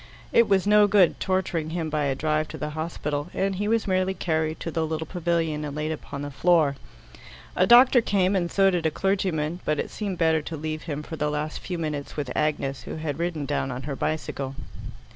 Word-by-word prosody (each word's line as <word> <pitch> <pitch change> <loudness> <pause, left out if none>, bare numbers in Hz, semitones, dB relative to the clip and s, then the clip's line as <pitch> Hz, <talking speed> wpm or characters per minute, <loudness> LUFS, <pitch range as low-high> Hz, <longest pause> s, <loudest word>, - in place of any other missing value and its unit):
It 235 - +5
was 195 -1 +3
no 210 0 +6
good 195 -4 +4
torturing 185 -4 -1
him 160 -1 -3
by 150 -1 0
a 135 -1 0
drive 155 +2 0
to 155 - -8
the 150 +1 -4
hospital, 150 -2 -3
and 195 0 0
he 205 +2 -1
was 225 0 +1
merely 185 0 +1
carried 160 -2 -1
to 165 - -3
the 160 0 -1
little 160 0 -2
pavilion 165 -3 -1
and 145 -1 -5
laid 155 +1 -2
upon 145 -2 -6
the 145 - -5
floor. 155 -1 +3 0.8
A - - +3
doctor 245 +1 +7
came, 195 -3 +1
and 175 -3 0
so 195 -1 +4
did 170 -3 +1
a - - +2
clergyman, 175 -3 -1
but 155 - 0
it - - -3
seemed 200 -4 -4
better 160 -2 +3
to 160 +2 -6
leave 155 +1 -4
him 150 -1 -5
for 160 - -7
the 150 0 0
last 150 +1 -3
few 180 - -5
minutes 150 -3 -4
with 140 -4 -3
Agnes, 145 -3 -1
who - - -7
had 155 -2 -4
ridden 170 -4 -2
down 140 -2 -1
on 125 0 -5
her 140 0 -4
bicycle. 140 -3 -3
160 Hz, 220 wpm, -25 LUFS, 150-185 Hz, 0.8 s, doctor